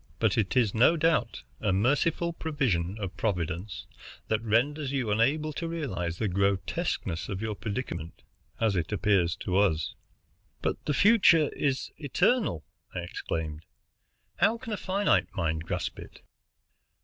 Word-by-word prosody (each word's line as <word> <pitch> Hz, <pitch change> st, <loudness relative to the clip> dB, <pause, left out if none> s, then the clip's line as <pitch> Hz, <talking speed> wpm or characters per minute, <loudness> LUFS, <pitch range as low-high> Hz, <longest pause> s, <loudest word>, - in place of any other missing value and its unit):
But 110 Hz, -1 st, +2 dB
it 110 Hz, +3 st, 0 dB
is 115 Hz, -6 st, +3 dB
no 130 Hz, +9 st, +5 dB
doubt 155 Hz, -7 st, +1 dB, 0.2 s
a 105 Hz, -, 0 dB
merciful 145 Hz, -, +1 dB
provision 120 Hz, -, -1 dB
of 95 Hz, -3 st, -4 dB
Providence 90 Hz, -3 st, -2 dB, 0.4 s
that 110 Hz, -1 st, +1 dB
renders 130 Hz, +6 st, +1 dB
you 130 Hz, -6 st, -1 dB
unable 145 Hz, +8 st, +1 dB
to 165 Hz, -, -3 dB
realize 95 Hz, -, -3 dB
the 110 Hz, -, 0 dB
grotesqueness 95 Hz, -2 st, -1 dB
of 95 Hz, -3 st, -3 dB
your 110 Hz, 0 st, -2 dB
predicament, 105 Hz, -6 st, -5 dB, 0.4 s
as 110 Hz, -3 st, +2 dB
it 85 Hz, 0 st, -1 dB
appears 100 Hz, -5 st, +2 dB
to 95 Hz, 0 st, -2 dB
us." 80 Hz, -6 st, +1 dB, 0.7 s
"But -, -, -1 dB
the 150 Hz, -, 0 dB
future 195 Hz, -8 st, +5 dB
is 135 Hz, -2 st, -1 dB
eternal!" 150 Hz, -, +1 dB, 0.3 s
I 90 Hz, -, -2 dB
exclaimed. 80 Hz, -2 st, -4 dB, 0.7 s
"How 215 Hz, +6 st, +3 dB
can 230 Hz, -2 st, -6 dB
a -, -, -2 dB
finite 190 Hz, -, +2 dB
mind 80 Hz, -4 st, -1 dB
grasp -, -, -3 dB
it?" -, -, -12 dB
110 Hz, 140 wpm, -28 LUFS, 90-150 Hz, 0.7 s, no